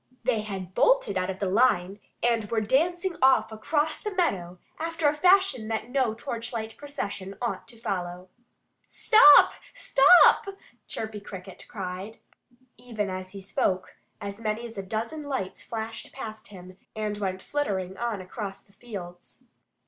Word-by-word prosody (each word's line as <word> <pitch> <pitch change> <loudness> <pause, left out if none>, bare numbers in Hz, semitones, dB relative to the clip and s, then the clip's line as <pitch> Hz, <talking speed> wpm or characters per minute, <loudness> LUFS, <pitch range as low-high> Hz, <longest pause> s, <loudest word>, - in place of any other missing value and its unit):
They 230 -3 +1
had 190 -4 -6
bolted - - +3
out 185 0 -1
of 190 - -3
the 200 - -2
line 195 -2 +2 0.2
and 230 -2 +2
were 230 - +1
dancing 345 - +1
off 265 -3 +4
across 295 +8 0
the 420 - -3
meadow 185 - 0 0.2
after 330 -1 0
a 290 - +3
fashion 360 - +3
that 225 +2 -3
no 255 -5 +1
torchlight 230 -1 -5
procession 200 -9 -5
ought 240 - -3
to 235 - -10
follow. 180 -5 -4 0.6
"Stop! 430 -3 +7 0.2
Stop!" 290 +8 +6 0.4
Chirpy 220 -1 -5
Cricket 190 -2 -10
called. 190 +2 -6 0.6
Even 215 -5 -4
as 185 0 -6
he 195 - -8
spoke, 185 -1 -1 0.2
as 200 +1 -7
many 220 +1 -2
as 230 -1 -9
a 195 - -3
dozen 225 +10 -4
lights 265 -10 -4
flashed 225 0 -6
past 220 -5 -8
him 185 -1 -13 0.2
and 210 -1 -3
went 190 -2 -3
flittering 190 -11 -2
on 230 -5 -2
across 195 +1 -7
the 200 - -28
fields. 185 -7 -10
220 Hz, 150 wpm, -27 LUFS, 190-260 Hz, 0.6 s, Stop